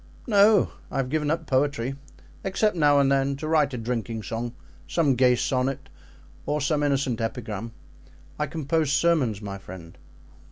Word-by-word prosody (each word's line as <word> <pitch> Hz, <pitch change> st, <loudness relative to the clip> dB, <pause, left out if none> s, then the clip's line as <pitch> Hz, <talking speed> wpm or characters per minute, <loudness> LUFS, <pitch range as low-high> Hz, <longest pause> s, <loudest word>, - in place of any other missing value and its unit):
"No, 205 Hz, -2 st, +5 dB, 0.2 s
I -, -, -5 dB
have 135 Hz, -2 st, -1 dB
given 150 Hz, -1 st, 0 dB
up 160 Hz, +1 st, -1 dB
poetry, 135 Hz, -2 st, 0 dB, 0.5 s
except 200 Hz, +1 st, +1 dB
now 145 Hz, -3 st, +4 dB
and 135 Hz, -1 st, +3 dB
then 135 Hz, 0 st, +2 dB
to 155 Hz, +3 st, -6 dB
write 155 Hz, -3 st, +3 dB
a -, -, -4 dB
drinking 115 Hz, -1 st, -3 dB
song, 115 Hz, +3 st, -4 dB, 0.3 s
some 155 Hz, -5 st, +2 dB
gay 125 Hz, 0 st, +4 dB
sonnet 130 Hz, +2 st, -1 dB, 0.6 s
or 150 Hz, +1 st, 0 dB
some 145 Hz, +1 st, 0 dB
innocent 135 Hz, -5 st, 0 dB
epigram; 115 Hz, -1 st, -4 dB, 0.7 s
I 150 Hz, -, 0 dB
compose 155 Hz, 0 st, -1 dB
sermons, 140 Hz, -8 st, +2 dB
my 100 Hz, -1 st, -6 dB
friend." 90 Hz, -3 st, -11 dB
135 Hz, 155 wpm, -25 LUFS, 120-150 Hz, 0.7 s, No